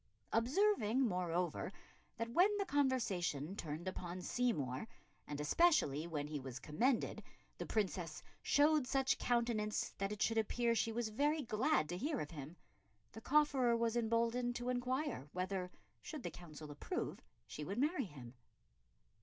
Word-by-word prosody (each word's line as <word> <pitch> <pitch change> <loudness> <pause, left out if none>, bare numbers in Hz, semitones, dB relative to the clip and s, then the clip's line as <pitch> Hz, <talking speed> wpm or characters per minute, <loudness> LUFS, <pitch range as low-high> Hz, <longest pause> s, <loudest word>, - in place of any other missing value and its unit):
Observing, 260 - +3
moreover, 180 -2 -1 0.5
that 230 0 -3
when 360 +7 +6
the 400 - 0
conversation 205 - 0
turned 160 0 -5
upon 180 -1 -4
Seymour, 180 - -1 0.4
and 145 - -4
especially 155 - +3
when 150 -4 -2
he 150 0 -4
was 130 -2 -6
commended, 230 - 0 0.4
the - - -4
Princess 175 -7 -1 0.2
"showed 295 -2 +4
such 270 0 +2
countenance 230 -3 0
that 195 +1 -1
it 210 - -4
should 225 +1 +2
appear 235 +2 +1
she 230 0 +1
was 230 0 -1
very 290 +7 +1
glad 215 -9 +2
to 175 - -2
hear 285 - -1
of 150 - -4
him," 155 +2 -8 0.5
the 220 - -9
cofferer 265 -4 +3
was 230 0 +1
emboldened 235 +1 +1
to 240 +1 -2
inquire 250 - -1
whether, 185 0 -2 0.3
should 300 -5 -7
the - - -3
Council 155 -3 -9
approve, 145 - -3 0.3
she 150 - -6
would 195 +7 -4
marry 290 +1 +1
him. 130 - -10
220 Hz, 145 wpm, -38 LUFS, 170-250 Hz, 0.5 s, when